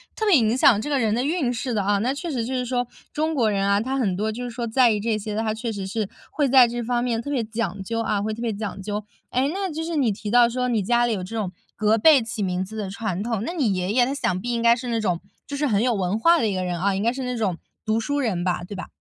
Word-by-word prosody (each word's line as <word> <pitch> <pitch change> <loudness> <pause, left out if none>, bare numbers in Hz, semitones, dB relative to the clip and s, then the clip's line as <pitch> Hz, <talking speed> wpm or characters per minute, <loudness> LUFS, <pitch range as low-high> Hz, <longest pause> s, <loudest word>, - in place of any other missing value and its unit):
特 440 - -2
别 405 -5 +5
影 225 -2 +2
响 235 -5 +6
这 295 - -4
个 280 - +1
人 220 -3 +1
的 240 +3 0
运 285 -4 0
势 250 +1 -3
的 205 -3 0
啊。 205 +1 +2
那 245 +6 0
确 330 +4 -5
实 240 -5 -1
就 260 - -4
是 250 -1 -1
说， 245 0 -1 0.3
中 315 +1 0
国 230 -5 +2
人 195 -1 0
啊， 200 0 +3
他 260 +4 -2
很 205 -9 +1
多 215 +3 -1
就 240 +3 -5
是 245 - -4
说 235 0 -4
在 240 +1 +4
意 210 - 0
这 220 +1 0
些 215 0 -5
的， 220 - 0
他 220 -1 -1
确 225 +1 -4
实 200 -2 -5
是， 210 0 -2 0.2
会 290 -2 +1
在 255 -1 +7
这 240 +1 -3
方 240 +1 0
面 235 -2 0
特 285 - -7
别 270 -5 0
讲 215 -4 -3
究 230 +4 -2
啊， 210 -3 0
会 215 +1 -2
特 225 - -7
别 230 -3 -1
讲 200 -1 -5
究。 210 +1 -3 0.3
诶， 260 +3 +1
那 385 -2 -2
就 315 +1 -4
是 330 0 -3
你 265 -7 +2
提 210 +1 -5
到 240 0 +6
说 250 +1 -1
你 225 -3 +1
家 240 +4 +3
里 235 - 0
有 190 -4 -3
这 210 +5 -7
种， 205 -5 -2 0.2
隔 215 +1 +2
辈 285 +4 +6
起 225 -1 -5
名 180 -1 -1
字 215 +4 -8
的 205 -3 -3
传 195 -2 -3
统。 225 -3 -2
那 335 - -3
你 265 - +1
爷 185 +2 -1
爷 245 +1 +4
他 265 - -2
想 185 -10 -1
必 245 - -3
应 235 - -1
该 235 0 +5
是 245 +1 -6
那 230 -1 0
种， 180 -5 0 0.3
就 285 - -5
是 295 +1 +1
很 215 -3 +2
有 250 -1 +2
文 190 -1 0
化 335 +7 +5
的 225 - +1
一 200 - -1
个 185 - -1
人 175 -1 -2
啊， 195 +2 +1
应 195 - -1
该 230 - +3
是 260 +1 -5
那 250 0 -2
种 195 -6 -1 0.3
读 220 +1 +1
书 285 +6 -1
人 200 -10 0
吧， 180 -1 -1
对 200 - -7
吧？ 185 - -6
230 Hz, 340 characters per minute, -23 LUFS, 205-250 Hz, 0.3 s, 在